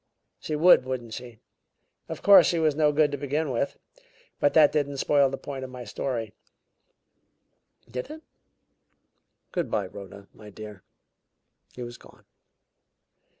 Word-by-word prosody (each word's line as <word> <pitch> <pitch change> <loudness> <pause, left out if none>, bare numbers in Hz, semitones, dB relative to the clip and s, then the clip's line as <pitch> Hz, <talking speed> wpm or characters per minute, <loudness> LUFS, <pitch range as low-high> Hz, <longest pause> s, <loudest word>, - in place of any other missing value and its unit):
She 155 - -4
would; 165 -2 +6
wouldn't 125 -3 -5
she? 120 -1 -9 0.7
Of - - -7
course, 195 -5 +8
she 170 - +1
was 160 -2 +2
no 150 0 +2
good 150 0 +2
to 145 - -4
begin 145 +1 -2
with. 125 +3 -2 0.6
But 145 - +2
that 155 -2 +7
didn't 145 -2 -1
spoil 140 0 +3
the 135 - -5
point 135 -2 -7
of 130 - -7
my 125 -1 -8
story, 115 -1 -4 1.5
did 125 - -6
it? 315 +1 -10 1.3
Good 175 -2 -2
by, 100 - -1
Rhoda, 100 +1 -11
my 105 -1 -13
dear." 105 -1 -10 0.9
He 125 - -6
was 120 0 -9
gone. - - -19
135 Hz, 145 wpm, -26 LUFS, 120-150 Hz, 1.5 s, course